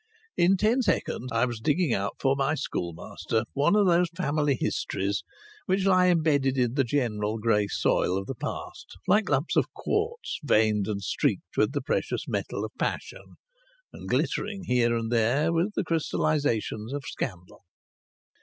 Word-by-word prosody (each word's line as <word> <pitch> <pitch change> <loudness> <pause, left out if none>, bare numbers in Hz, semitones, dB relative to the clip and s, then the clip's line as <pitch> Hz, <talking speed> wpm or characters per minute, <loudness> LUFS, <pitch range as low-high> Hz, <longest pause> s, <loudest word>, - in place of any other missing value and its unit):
In 185 +3 +4
ten 225 +6 +2
seconds 130 - -1
I 115 +2 +2
was 120 -3 -4
digging 150 +2 +1
out 100 +1 -2
for 135 0 +2
my 140 +3 +1
schoolmaster 100 - -3
one 145 +8 +3
of 210 -1 +4
those 175 -1 +4
family 145 -5 +1
histories 100 +1 -1 0.4
which 190 +1 +1
lie 185 -1 +5
embedded 150 -6 +2
in 120 -2 +1
the 135 0 +2
general 115 -5 -1
grey 105 -2 +2
soil 95 -1 +1
of 95 - -3
the 135 - -4
past 115 - -7
like 205 +1 +3
lumps 145 +2 +1
of - - +2
quartz 450 +3 -2
veined 110 -6 +2
and 100 -2 -3
streaked - - -1
with 105 +5 +2
the 145 - -1
precious - - -2
metal - - -2
of - - -8
passion - - -4 0.6
and - - -9
glittering 195 -2 -1
here 120 -4 +2
and 115 0 -2
there 125 +8 +2
with 175 +6 0
the - - 0
crystallizations 145 - -1
of 145 -1 -4
scandal. 90 -2 -6
135 Hz, 160 wpm, -27 LUFS, 110-170 Hz, 0.6 s, lie